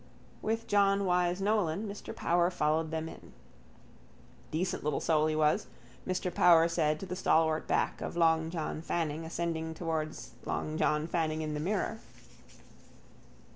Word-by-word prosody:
With 225 +1 -1
John 200 -1 +3
Wyse 180 0 +1
Nolan 205 -1 +1
Mr 200 0 -7
Power 175 +1 +2
followed 160 -2 0
them 160 0 -3
in. - - -12 1.2
—Decent 175 +4 -2
little 150 -1 0
soul 155 -1 +2
he 155 - 0
was, 155 -1 +2 0.4
Mr 185 -1 -1
Power 165 -2 +6
said 155 -2 +1
to - - -4
the 180 - -5
stalwart 160 -3 +2
back - - 0
of - - -4
long 160 -1 +3
John 160 -2 -3
Fanning 165 -1 -2
ascending 160 -1 -3
towards 155 -6 -3
long 155 - -3
John 150 -1 +1
Fanning 160 -2 -1
in 155 -1 -3
the 150 - -3
mirror. 205 +6 -1
165 Hz, 145 wpm, -31 LUFS, 155-180 Hz, 1.2 s, Power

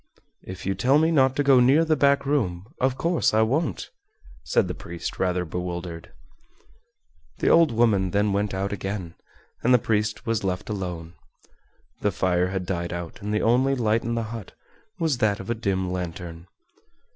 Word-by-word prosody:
"If 95 -1 -9
you 95 - +1
tell 125 +9 +3
me 160 +2 +3
not 135 -4 +3
to 145 - +1
go 135 -2 +6
near 135 +7 +5
the 155 -1 +2
back 140 0 +3
room, 100 -11 0
of 130 0 +1
course 170 -9 +1
I 110 - +5
won't," 130 - -1 0.5
said - - +1
the - - -3
priest, 85 -1 -7
rather 90 -1 0
bewildered. 85 0 -5 1.3
The - - +1
old 165 -5 +5
woman 110 -5 +2
then 100 +2 +1
went 100 +1 0
out 95 +1 -2
again, 95 -3 -4 0.5
and 125 +1 +5
the - - +7
priest 105 -2 -1
was 115 -3 -1
left 90 +1 -3
alone. 90 -4 -5 0.9
The 105 - +1
fire 90 -1 +1
had 95 -1 -3
died 85 -2 -3
out, 85 -1 -6
and 105 +1 -4
the 105 - 0
only 130 +4 +3
light 115 -2 +1
in 115 +1 -2
the 115 - -1
hut 115 -5 -8 0.4
was 160 -8 0
that 105 -3 +1
of 115 - -5
a - - +3
dim 95 -5 -1
lantern. 85 -1 -6
105 Hz, 180 wpm, -25 LUFS, 90-125 Hz, 1.3 s, the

